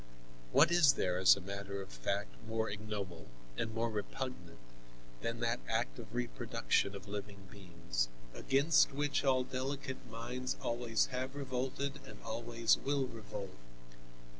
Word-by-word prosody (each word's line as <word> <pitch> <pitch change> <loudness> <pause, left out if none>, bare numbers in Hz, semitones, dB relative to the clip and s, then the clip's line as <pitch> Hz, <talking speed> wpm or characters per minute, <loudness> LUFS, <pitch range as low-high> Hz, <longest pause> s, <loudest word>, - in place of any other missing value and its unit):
What - - +6
is 170 -5 +7
there 90 -1 0
as 95 0 +8
a 100 - -7
matter 100 +1 -4
of 95 - -7
fact 100 +13 -2
more 110 -1 0
ignoble 100 -5 -5 0.3
and 110 - -1
more 115 +1 0
repugnant 105 - -4 0.6
than 115 0 -2
that 115 +1 +1
act 115 +2 0
of 110 -1 -9
reproduction 100 - 0
of 100 +1 -8
living 100 -1 -5
beings, 85 -11 -2 0.3
against 140 +2 +4
which 145 +1 +1
all 130 -2 +4
delicate 130 +1 -3
minds 120 +3 -3
always 115 -1 +1
have 130 +2 -2
revolted 135 +1 -2
and 105 - -9
always 115 0 +2
will 140 -1 +1
revolt? 105 -5 -7
115 Hz, 140 wpm, -35 LUFS, 100-130 Hz, 0.6 s, as